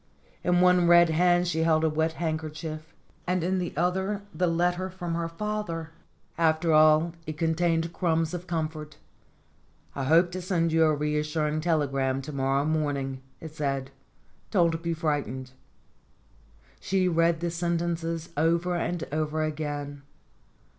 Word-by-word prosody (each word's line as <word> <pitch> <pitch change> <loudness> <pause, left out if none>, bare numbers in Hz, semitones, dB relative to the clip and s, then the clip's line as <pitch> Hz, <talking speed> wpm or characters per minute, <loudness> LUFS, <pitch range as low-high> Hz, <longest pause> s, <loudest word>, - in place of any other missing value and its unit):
In 180 0 +3
one 180 -1 +5
red 175 0 +7
hand 175 +2 +3
she 160 -2 -1
held 160 -1 +3
a - - +4
wet 160 +1 0
handkerchief, 155 -1 -5 0.3
and 180 -1 0
in 185 +2 0
the 175 -2 -3
other 190 +4 0
the 180 - +1
letter 175 +2 0
from 175 -2 -5
her 165 0 -2
father. 170 -4 -4 0.5
After 160 0 +2
all, 155 +2 +5
it 155 -1 -5
contained 165 +1 0
crumbs 165 -1 0
of 180 0 -6
comfort. 155 -2 -4 1.0
"I 135 - -3
hope 170 +5 +4
to 185 +1 -5
send 175 -2 0
you 160 0 +4
a 155 -1 +3
reassuring 150 +1 -1
telegram 135 -5 0
to 150 +2 -7
morrow 135 +1 +1
morn 155 -2 0
ing," 135 -1 -5 0.2
it 160 -2 -9
said. 135 -3 -2 0.6
"Don't 170 -5 +2
be 170 0 -2
frightened." 140 -5 -2 1.3
She 190 -1 +1
read 165 -1 +2
the 170 0 -2
sentences 170 -1 -2
over 170 +3 +1
and 175 0 -2
over 155 +1 -1
again. 145 -2 -4
165 Hz, 145 wpm, -27 LUFS, 155-175 Hz, 1.3 s, red